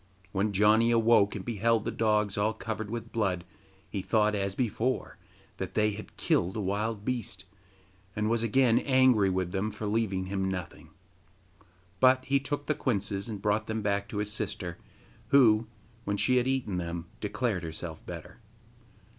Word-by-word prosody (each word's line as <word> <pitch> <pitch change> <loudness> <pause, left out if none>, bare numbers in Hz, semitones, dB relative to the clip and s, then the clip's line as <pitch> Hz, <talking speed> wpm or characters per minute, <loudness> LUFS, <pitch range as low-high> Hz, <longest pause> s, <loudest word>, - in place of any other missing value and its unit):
When 100 +2 0
Janni 105 +3 +4
awoke 115 -3 +4
and 95 - -6
beheld 115 -1 +1
the - - -1
dogs 105 -3 +1
all 105 +2 +1
covered 110 -1 -5
with 115 +1 -5
blood, 95 -6 -1 0.4
he 100 - -4
thought, 105 +1 +2
as 100 -1 -1
before, 125 +1 -1 0.4
that - - -5
they 105 0 +3
had 105 +1 -9
killed 90 +2 +1
a - - -2
wild 105 +2 -2
beast, 125 -3 -4 0.7
and 110 0 0
was 115 0 +2
again 115 +1 +3
angry 130 -7 +4
with 90 -1 -1
them 100 +2 -1
for 105 0 -6
leaving 105 -3 0
him 95 0 -1
nothing. 90 -3 -6 1.1
But 130 0 +5
he 140 +1 +2
took 145 +1 -3
the 150 - +1
quinces 100 -6 -2
and 105 -3 -6
brought 105 +1 +1
them 110 -1 -2
back 100 0 0
to 105 - -5
his 105 0 -1
sister, 95 -5 -4 0.5
who, 115 -5 +5 0.4
when 100 -1 -1
she 125 +4 +3
had 125 0 +2
eaten 130 -8 -1
them, 85 -1 -4
declared 105 -2 -1
herself 80 -1 -6
better. - - -9
105 Hz, 165 wpm, -29 LUFS, 100-115 Hz, 1.1 s, But